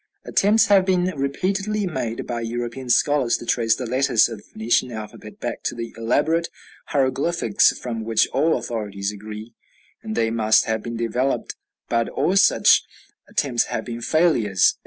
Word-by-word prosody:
Attempts 210 +3 +3
have 200 -2 +5
been 185 -1 +1
repeatedly 195 +9 -1
made 120 -10 -4
by 120 -1 -4
European 120 +2 -5
scholars 135 -1 +2
to - - -10
trace 115 -2 +2
the 125 - -5
letters 130 -1 +3
of 115 -3 -8
the - - -19
Phoenician 115 +3 0
alphabet 110 -2 -9
back - - -4
to - - -2
the 115 -1 -6
elaborate 150 +9 +1 0.4
hieroglyphics 145 +8 +1
from 115 -3 -5
which 115 0 +2
all 155 +4 +1
authorities 105 -4 -4
agree 105 +2 -9 0.5
they 215 - -1
must 110 -1 +3
have 110 0 -1
been 115 0 -6
developed, 125 +4 -1 0.3
but 115 -1 0
all 185 - 0
such 195 - +5 0.5
attempts 140 - 0
have 115 -2 -4
been 120 -1 -6
failures. 120 - +2
120 Hz, 155 wpm, -22 LUFS, 115-155 Hz, 0.5 s, have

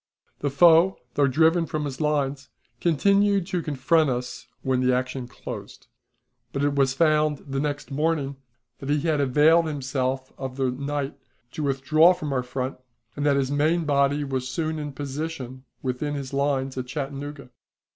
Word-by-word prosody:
The 145 - -1
foe, 170 +5 +5 0.2
though 145 -1 +3
driven 160 +5 +3
from 150 0 -2
his 140 +1 -5
lines, 140 -2 -1 0.3
continued 200 +4 +3
to 180 -1 -2
confront 150 +1 +2
us 125 0 -4 0.2
when 130 -1 +1
the 130 0 +3
action 130 0 -2
closed. - - -9 0.7
But 140 - -2
it 145 0 +2
was 135 -2 +2
found 155 -2 +2
the 135 0 -2
next 145 0 -3
morning 145 -2 0 0.4
that 135 - -7
he 145 0 +2
had 155 -2 +1
availed 150 +5 +4
himself 130 -2 -2
of 130 -1 -5
the 130 -2 +1
night 140 +1 -4 0.3
to - - -5
withdraw 150 +5 +4
from 150 -4 -4
our 130 - +1
front, 130 +1 -4 0.4
and 145 - -3
that 140 -1 +4
his 135 -1 0
main 155 +4 +2
body 145 0 +2
was 130 -2 -3
soon 155 +2 -2
in 145 -1 -5
position 135 -2 -5 0.2
within 135 +3 -2
his 140 -1 -6
lines 135 -1 0
at 125 - -5
Chattanooga. 140 0 -6
140 Hz, 165 wpm, -25 LUFS, 130-155 Hz, 0.7 s, foe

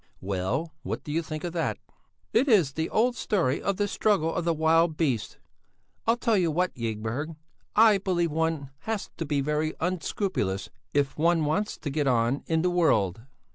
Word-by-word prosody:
"Well, 100 - -2
what - - -4
do 150 - -6
you 165 +3 +1
think 155 -2 -6
of 175 -1 -3
that?" 165 -2 -1 0.6
"It's 220 - +4
the 160 +3 -2
old 240 +3 +2
story 175 - 0
of 200 -1 -1
the 205 - +1
struggle 195 -5 +1
of 170 - -2
the 170 - +3
wild 160 +1 +3
beasts. 135 -9 -1 0.7
I'll 230 +1 +4
tell 230 -4 +2
you 175 -2 +2
what, 180 +4 0
Ygberg, 115 +7 -3 0.4
I 215 -2 +6
believe 175 -4 0
one 160 -3 -1
has 220 -2 -4
to 165 - -3
be 145 -1 +1
very 150 +2 -1
unscrupulous 175 - -2 0.2
if 145 0 0
one 165 0 +3
wants 200 +8 -1
to 145 - -5
get 145 0 0
on 120 +2 +2
in 160 0 +1
the 180 - +2
world." 110 - +2
160 Hz, 175 wpm, -27 LUFS, 140-185 Hz, 0.7 s, I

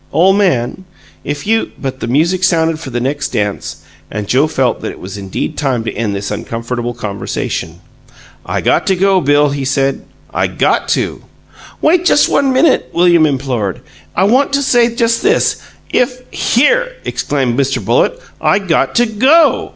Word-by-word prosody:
Ole 180 +6 +4
man, 180 -7 0 0.4
if 145 0 -4
you 225 +1 0
" - - -25
But 135 -2 -5
the - - -4
music 170 +9 +1
sounded 165 -3 +2
for 160 - -7
the 120 -1 -2
next 140 +2 -2
dance, 105 -1 -3 0.3
and 105 -1 -5
Joe 135 +7 +3
felt 130 -6 0
that - - -4
it - - -9
was 95 +2 -8
indeed 95 -2 -4
time 130 -6 0
to 115 - -4
end 105 -2 -2
this 100 0 -4
uncomfortable 120 +1 -4
conversation. 100 -5 -4 0.6
"I - - -3
got - - +1
to 190 - +3
go, 190 0 +2
Bill," 145 0 +3
he 140 -1 -3
said. 135 0 0 0.3
"I - - +1
GOT - - 0
to!" - - -1 0.6
"Wait 340 +3 +3
just 295 - +4
one 275 -1 +2
minute," 260 +6 +2
William 170 -2 +4
implored. 125 - -2 0.3
"I 185 - +2
want 255 +9 +3
to 280 0 +2
say 240 -3 +2
just 230 -1 +1
this: 435 +3 +2 0.3
if 250 0 0
" - - -30
"Here!" - - +2
exclaimed 130 -5 -1
Mr. 135 0 +1
Bullitt. 115 +4 +1 0.2
"I 155 +3 +3
got 190 -6 0
to 240 - +4
GO!" 260 +10 +3
150 Hz, 175 wpm, -14 LUFS, -, 0.6 s, Ole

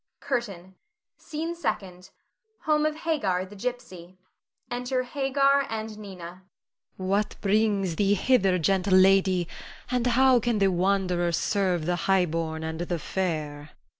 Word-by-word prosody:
CURTAIN. 200 -9 -4 0.5
SCENE 325 +2 -4
SECOND. 185 - -4 0.5
[Home 305 0 +2
of 310 - -3
Hagar, 290 - -1
the 200 +2 -13
gypsy. 190 -6 -6 0.6
Enter 250 +1 -1
Hagar 275 +1 +1
and 220 -1 -5
Nina.] 195 -4 -10
Hagar. 175 +2 -9 0.6
What 195 +2 -1
brings 200 -4 +1
thee 205 0 +3
hither, 195 -4 +3
gentle 185 +2 +2
lady, 190 -2 +4 0.4
and 250 -1 +1
how 255 +1 +5
can 235 -1 0
the 195 -2 +3
wanderer 180 -1 +1
serve 180 -2 0
the 175 +1 0
high 190 -2 +4
born 160 -1 -3
and 160 0 -4
the 175 0 -2
fair? 155 -5 -4
195 Hz, 135 wpm, -26 LUFS, 180-245 Hz, 0.6 s, how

